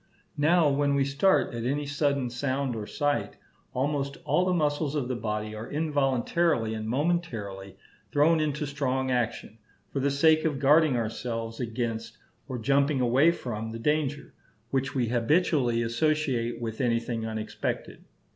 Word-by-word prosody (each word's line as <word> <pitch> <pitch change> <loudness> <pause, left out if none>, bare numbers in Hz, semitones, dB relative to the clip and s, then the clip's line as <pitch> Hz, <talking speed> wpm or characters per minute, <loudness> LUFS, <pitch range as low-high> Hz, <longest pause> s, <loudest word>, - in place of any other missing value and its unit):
Now 160 +2 +4
when 140 0 +2
we 140 -1 +2
start 140 +6 +2
at 115 -1 -4
any 145 +4 -1
sudden 140 -3 0
sound 130 0 -1
or 105 -2 -5
sight, 145 -1 -1 0.4
almost 140 +2 -1
all 180 - +2
the 185 - +1
muscles 150 -2 0
of 140 -5 -1
the 125 - -2
body 105 -1 -3
are 110 +2 -7
involuntarily 145 -3 +1
and 110 0 -4
momentarily 115 - -2 0.3
thrown 155 +3 +4
into 150 0 -1
strong 130 -2 -1
action, 115 -2 -2 0.3
for 140 - 0
the 140 +1 +2
sake 155 +3 +4
of 155 -4 0
guarding 145 0 +4
ourselves 115 0 -3
against 115 -2 -3 0.3
or 130 -3 -4
jumping 140 +4 +2
away 130 +6 +4
from 115 -9 -3
the 115 - -5
danger, 145 +3 -1 0.4
which 135 0 -1
we 120 -4 +1
habitually 120 -1 +2
associate 120 -2 0
with 115 +1 -4
anything 115 -2 0
unexpected. 110 -1 -4
135 Hz, 145 wpm, -27 LUFS, 115-145 Hz, 0.4 s, Now